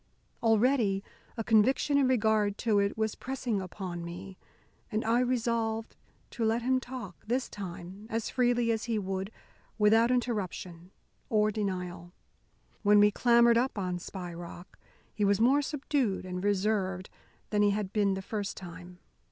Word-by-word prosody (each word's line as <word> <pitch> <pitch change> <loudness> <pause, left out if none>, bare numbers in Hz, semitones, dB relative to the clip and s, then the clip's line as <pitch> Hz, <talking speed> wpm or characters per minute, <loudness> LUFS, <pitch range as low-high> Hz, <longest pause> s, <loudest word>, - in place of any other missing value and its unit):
Already 225 -3 +3 0.3
a 225 - -2
conviction 240 +6 +3
in 280 -2 +4
regard 220 -4 +2
to 215 -4 +2
it 200 +1 0
was 220 -1 0
pressing 250 -6 -3
upon 180 -2 -6
me, 185 +3 -8 0.6
and 215 0 -1
I 230 +2 +3
resolved 230 -3 -1 0.4
to 235 - -3
let 225 +2 +1
him 260 +1 +2
talk, 245 -9 -8
this 250 +3 0
time, 190 +1 -8
as 225 -1 -2
freely 240 -2 +2
as 225 -1 -1
he 230 -2 -1
would, 190 -1 -3 0.5
without 225 +2 +5
interruption 190 -8 -2 0.4
or 215 -1 +3
denial. 180 -4 -4 0.7
When 205 0 +5
we 205 0 +6
clambered 235 +1 +5
up 255 -1 -1
on 180 -2 -2
Spy 180 -1 -7
Rock, 175 +1 -10 0.3
he 210 - -2
was 200 0 +3
more 265 +6 +4
subdued 275 -8 -1
and 180 0 -5
reserved 195 -2 0 0.4
than 210 -1 +2
he 205 - +5
had 200 -1 -2
been 200 -2 +2
the 190 - -5
first 205 0 -4
time. 180 0 -10
210 Hz, 150 wpm, -30 LUFS, 190-235 Hz, 0.7 s, we